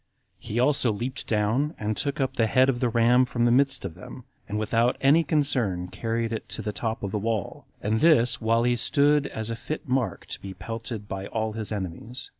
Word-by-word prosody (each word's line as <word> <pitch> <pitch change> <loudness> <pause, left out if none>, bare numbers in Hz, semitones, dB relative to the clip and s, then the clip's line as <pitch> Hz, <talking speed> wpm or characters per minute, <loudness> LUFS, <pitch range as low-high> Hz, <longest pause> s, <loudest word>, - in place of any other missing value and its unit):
He 110 - -3
also 130 -2 +3
leaped 125 +6 -3
down, 115 +8 +1
and 110 0 -2
took 140 +5 -2
up 135 -1 0
the 115 - +2
head 130 +4 +4
of 120 -2 0
the 125 -1 +1
ram 120 +2 +4
from 120 -1 0
the 120 - +4
midst 135 -2 +2
of 90 - -5
them, - - -11 0.3
and 105 - -2
without 115 +3 +1
any 145 +5 +5
concern 125 - 0
carried 115 +2 -2
it 110 - -5
to - - -4
the 105 - -2
top 110 0 -3
of 100 - -3
the 105 - -1
wall, 110 -2 -3 0.2
and 110 +2 +1
this 145 -9 +4
while 115 +1 +2
he 120 0 +2
stood 145 +4 +3
as 110 +1 -5
a - - -2
fit 130 +7 -6
mark 130 -2 -1
to - - -6
be 95 -1 -8
pelted 115 -2 -6
by 95 0 -5
all 110 -1 -2
his 110 -1 -3
enemies. 105 +5 -5
115 Hz, 220 wpm, -26 LUFS, 110-130 Hz, 0.3 s, any